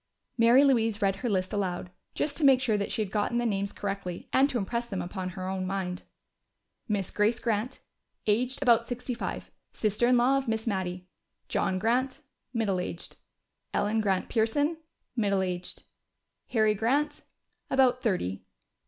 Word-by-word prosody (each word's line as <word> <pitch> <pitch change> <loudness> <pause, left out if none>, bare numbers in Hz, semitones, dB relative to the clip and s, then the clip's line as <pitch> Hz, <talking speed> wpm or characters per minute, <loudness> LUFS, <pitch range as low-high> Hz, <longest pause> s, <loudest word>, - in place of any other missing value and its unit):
Mary 235 +3 +6
Louise 225 -6 +3
read 195 -2 +1
her 240 +4 -2
list 185 -3 0
aloud, 180 -3 -2 0.2
just 290 -1 -1
to 315 - -2
make 270 -2 +7
sure 245 -4 +1
that 200 -1 -2
she 220 - 0
had 195 - -7
gotten 210 +3 0
the 240 - +1
names 200 -2 0
correctly 195 -3 -5
and 270 +2 +5
to 255 - -1
impress 235 +3 -2
them 195 -5 -4
upon 185 +1 -4
her 185 0 -6
own 190 0 -2
mind. 185 -1 -3 0.9
"Mrs. 200 -3 -1
Grace 215 +3 +2
Grant 225 +2 -2 0.4
aged 245 +6 +1
about 235 -2 +4
sixty 250 +1 -3
five, 235 - -5 0.2
sister 215 +2 +1
in 250 0 +5
law 260 +3 +4
of 270 - -7
Miss 225 -1 -1
Mattie. 185 -4 -2 0.4
"John 185 - 0
Grant 250 +6 0 0.3
middle 215 -6 0
aged. 175 -1 -6 0.6
"Ellen 215 +2 +1
Grant 195 -3 0
Pearson 285 +8 +1 0.4
middle 200 -5 +2
aged. 180 -1 -5 0.6
"Harry 215 -2 +3
Grant 280 +8 0 0.5
about 255 -2 +3
thirty. 140 - -1
220 Hz, 160 wpm, -28 LUFS, 190-245 Hz, 0.9 s, make